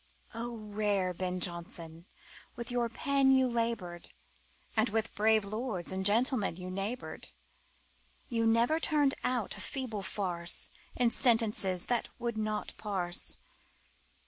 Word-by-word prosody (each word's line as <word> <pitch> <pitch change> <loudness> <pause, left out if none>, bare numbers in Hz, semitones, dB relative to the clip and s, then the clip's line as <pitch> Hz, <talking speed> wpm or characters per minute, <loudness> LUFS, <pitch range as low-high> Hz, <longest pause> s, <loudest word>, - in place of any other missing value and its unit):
O 235 +1 -4
rare 205 -3 -1
Ben 180 +1 -2
Jonson, 170 -1 0 0.5
with 240 0 -5
your 240 -1 0
pen 275 +3 +2
You 260 -1 +5
labored, 230 -8 -2 0.7
And 220 +1 +3
with 225 +1 -1
brave 215 0 +3
lords 215 -4 -3
and 190 0 -2
gentlemen 220 -1 +3
You 180 +1 -7
neighbored 200 +7 -4 1.0
You 230 -2 +1
never 235 +8 +3
turned 295 -4 +2
out 245 -4 0
feeble 250 -7 -3
farce 180 -3 +1 0.2
In 245 -2 +2
sentences 220 -8 +3
that 240 -2 0
would 235 -1 -3
not 215 -1 -2
parse. 185 -5 -1
220 Hz, 120 wpm, -31 LUFS, 190-240 Hz, 1.0 s, You